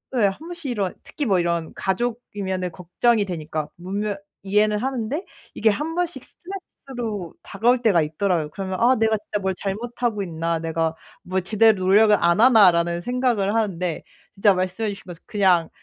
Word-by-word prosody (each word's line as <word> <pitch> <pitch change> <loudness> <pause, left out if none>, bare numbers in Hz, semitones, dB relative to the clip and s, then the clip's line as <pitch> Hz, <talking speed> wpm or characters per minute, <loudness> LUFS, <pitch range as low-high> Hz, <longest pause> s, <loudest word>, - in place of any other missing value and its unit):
예 230 -4 +4
1 195 - -3
번씩 330 -4 -6
이런 200 -5 -1
특히 295 - -4
뭐 195 -6 +3
이런 170 -2 -1
가족이면은 190 -4 -2
걱정이 205 +6 +1
되니까 155 -4 -4
분명 200 +3 -2 0.3
이해는 210 +2 +2
하는데 265 - -2 0.3
이게 220 - +2
1 300 +10 -1
번씩 355 -1 -2
스트레스로 245 - -7
다가올 240 +5 +1
때가 195 -7 +4
있더라고요. 160 0 0
그러면 190 +1 -4
'아 255 +2 +5
내가 220 0 +2
진짜 210 0 -4
뭘 190 -1 -1
잘못하고 225 +2 -3
있나. 165 -1 -2
내가 165 0 -1 0.3
뭘 185 0 -2
제대로 220 +2 +4
노력을 210 +2 +6
안 170 +5 +3
하나.'라는 175 -8 +5
생각을 240 -3 0
하는데 180 -6 -1 0.3
진짜 200 0 +4
말씀해 185 +4 -1
주신 200 -1 -7
것처럼 175 -2 -11
그냥 185 -6 +3
200 Hz, 360 characters per minute, -23 LUFS, 180-230 Hz, 0.3 s, 노력을